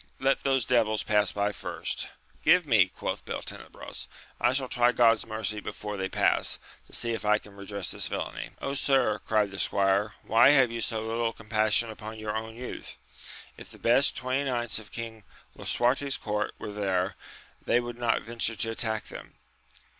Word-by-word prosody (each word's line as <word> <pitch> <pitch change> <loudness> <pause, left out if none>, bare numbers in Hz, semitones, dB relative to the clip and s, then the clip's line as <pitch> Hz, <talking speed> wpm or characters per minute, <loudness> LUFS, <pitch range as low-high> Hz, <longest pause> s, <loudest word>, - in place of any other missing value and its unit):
Let 135 +1 +2
those 135 -3 +2
devils 110 -4 +2
pass 105 -3 +2
by 100 0 0
first. - - -4 0.4
Give 180 -1 +5
me! 110 -9 +5
quoth - - -4
Beltenebros, - - -7 0.3
I 120 - +4
shall 130 0 -1
try 120 0 +3
God's 115 -2 +4
mercy 110 -1 -3
before 105 0 -5
they 95 -1 -2
pass, - - +2 0.3
to - - -21
see 115 - 0
if 115 - -4
I 105 0 +4
can 105 -1 -14
re 100 0 -10
dress 100 -3 -2
this - - -2
villainy. - - -4 0.2
sir, 135 -6 +2
cried 105 -2 +1
the 100 - -6
squire, 100 +1 +2
why 115 +4 +6
have 130 -3 +5
you 115 0 -3
so 110 -1 -1
little 115 0 -1
compassion 110 +1 +1
upon 110 0 -8
your 110 -1 -3
own 110 0 -4
youth! 125 +1 -7 0.6
if - - -11
the - - -12
best 125 +5 +3
twenty 130 +2 0
knights 120 -4 -1
of 110 - -13
King 115 -2 -7 0.3
Lisuarte*s 135 +3 +1
court 105 -1 -2
were 105 - -6
here, 95 -2 0 0.5
they 120 - +3
would 120 0 -6
not 120 -1 +1
venture 115 0 0
to 115 +3 0
attack 110 -1 -2
them. - - -10
110 Hz, 175 wpm, -28 LUFS, 105-120 Hz, 0.6 s, why